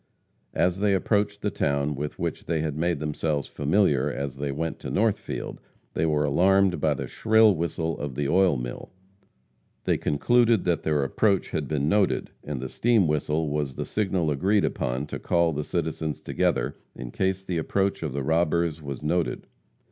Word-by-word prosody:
As 90 Hz, +1 st, +1 dB
they 100 Hz, -1 st, +3 dB
approached 100 Hz, +1 st, 0 dB
the 105 Hz, -, 0 dB
town 70 Hz, -2 st, 0 dB
with 75 Hz, +1 st, -5 dB
which -, -, -3 dB
they 80 Hz, -2 st, 0 dB
had 75 Hz, -2 st, -2 dB
made 85 Hz, +1 st, 0 dB
themselves 75 Hz, -1 st, -2 dB
familiar 75 Hz, -3 st, +2 dB
as 70 Hz, -1 st, -4 dB
they 70 Hz, 0 st, -2 dB
went 80 Hz, +3 st, -3 dB
to -, -, -6 dB
Northfield, 110 Hz, 0 st, -1 dB, 0.3 s
they 80 Hz, -, +1 dB
were 75 Hz, -1 st, +2 dB
alarmed 95 Hz, +5 st, +3 dB
by -, -, +2 dB
the -, -, -4 dB
shrill 110 Hz, -1 st, +4 dB
whistle 80 Hz, -1 st, -2 dB
of 70 Hz, -3 st, -4 dB
the 70 Hz, 0 st, -1 dB
oil 90 Hz, -1 st, +3 dB
mill. -, -, -6 dB, 0.9 s
They -, -, +1 dB
concluded 115 Hz, +9 st, +3 dB
that 85 Hz, -4 st, +1 dB
their 75 Hz, -2 st, +1 dB
approach 100 Hz, +7 st, +1 dB
had 75 Hz, -4 st, -2 dB
been 75 Hz, -2 st, 0 dB
noted, 100 Hz, +3 st, +1 dB
and 75 Hz, -3 st, -4 dB
the 65 Hz, -, -4 dB
steam 115 Hz, -, +2 dB
whistle 75 Hz, +1 st, 0 dB
was 75 Hz, -3 st, -2 dB
the -, -, -3 dB
signal 95 Hz, -7 st, 0 dB
agreed 95 Hz, +8 st, +2 dB
upon 65 Hz, +3 st, -2 dB
to -, -, -6 dB
call 85 Hz, -1 st, +2 dB
the 75 Hz, +1 st, -2 dB
citizens 80 Hz, -2 st, -2 dB
together -, -, 0 dB, 0.2 s
in 60 Hz, -2 st, -7 dB
case 95 Hz, 0 st, -1 dB
the 90 Hz, -3 st, -2 dB
approach 95 Hz, +4 st, 0 dB
of 80 Hz, -4 st, -3 dB
the 70 Hz, +1 st, -3 dB
robbers 80 Hz, +1 st, +1 dB
was 70 Hz, -1 st, -6 dB
noted. 85 Hz, +2 st, -1 dB
80 Hz, 180 wpm, -26 LUFS, 75-95 Hz, 0.9 s, shrill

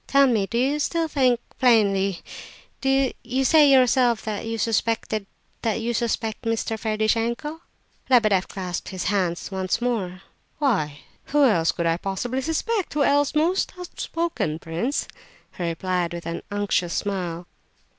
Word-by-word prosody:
Tell 275 Hz, 0 st, +5 dB
me, 220 Hz, -7 st, +2 dB
do 235 Hz, -, -2 dB
you 275 Hz, +5 st, +1 dB
still 330 Hz, +2 st, 0 dB
think... 255 Hz, -5 st, +2 dB, 0.2 s
plainly, 200 Hz, -7 st, +3 dB, 0.6 s
you 270 Hz, -1 st, 0 dB
say 300 Hz, -1 st, +6 dB
yourself 250 Hz, -3 st, +4 dB
that 215 Hz, 0 st, -4 dB
you 225 Hz, 0 st, -2 dB
suspect 225 Hz, 0 st, 0 dB
Mr. 225 Hz, +1 st, -2 dB
Ferdishenko?" 230 Hz, +8 st, -1 dB, 0.5 s
Lebedeff 215 Hz, -7 st, +4 dB
clasped 180 Hz, -3 st, -5 dB
his 185 Hz, -1 st, -4 dB
hands 180 Hz, -2 st, -1 dB
once 190 Hz, +1 st, -1 dB
more. 200 Hz, -7 st, -2 dB, 0.3 s
"Why, 170 Hz, -, 0 dB, 0.2 s
who 295 Hz, 0 st, +2 dB
else 170 Hz, -10 st, +3 dB
could 170 Hz, -, -3 dB
I 165 Hz, 0 st, +2 dB
possibly 235 Hz, +8 st, -3 dB
suspect? 335 Hz, -, -1 dB
Who 295 Hz, -, +3 dB
else, 285 Hz, +1 st, +2 dB
most 340 Hz, +5 st, +1 dB
outspoken 335 Hz, -, -3 dB
prince?" 170 Hz, -, -2 dB, 0.5 s
he 180 Hz, -, -3 dB
replied, 175 Hz, +1 st, -1 dB
with 170 Hz, -, -7 dB
an 170 Hz, -, -4 dB
unctuous 205 Hz, -4 st, 0 dB
smile. 180 Hz, -4 st, -3 dB
225 Hz, 130 wpm, -24 LUFS, 190-270 Hz, 0.6 s, say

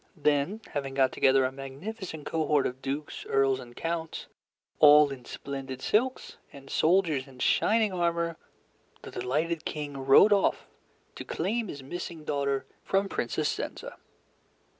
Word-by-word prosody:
Then, 150 Hz, +8 st, +1 dB
having 135 Hz, -2 st, -3 dB
got 130 Hz, -2 st, +3 dB
together 135 Hz, 0 st, +4 dB
a 130 Hz, -, -1 dB
magnificent 155 Hz, +6 st, -7 dB
cohort 150 Hz, -3 st, +1 dB
of 130 Hz, +1 st, -4 dB
dukes, 145 Hz, +2 st, -4 dB
earls, 135 Hz, -1 st, +2 dB
and 120 Hz, -2 st, -11 dB
counts, 165 Hz, -1 st, -4 dB, 0.5 s
all 150 Hz, -1 st, +8 dB
in 130 Hz, -3 st, -8 dB
splendid 135 Hz, -2 st, -6 dB
silks, 255 Hz, +5 st, 0 dB
and 135 Hz, -1 st, -12 dB
soldiers 160 Hz, -6 st, +2 dB
in 130 Hz, -1 st, -15 dB
shining 215 Hz, -, +2 dB
armor, 170 Hz, -1 st, 0 dB, 0.7 s
the -, -, -9 dB
delighted 155 Hz, +6 st, -1 dB
King 145 Hz, -2 st, -5 dB
rode 135 Hz, +10 st, +7 dB
off 200 Hz, -, +1 dB, 0.5 s
to -, -, -7 dB
claim 225 Hz, +2 st, -2 dB
his 140 Hz, -6 st, -8 dB
missing 165 Hz, +2 st, -6 dB
daughter 140 Hz, -2 st, -1 dB, 0.2 s
from 195 Hz, +1 st, 0 dB
Princess -, -, -1 dB
Zenza. -, -, -6 dB
150 Hz, 140 wpm, -28 LUFS, 135-170 Hz, 0.7 s, all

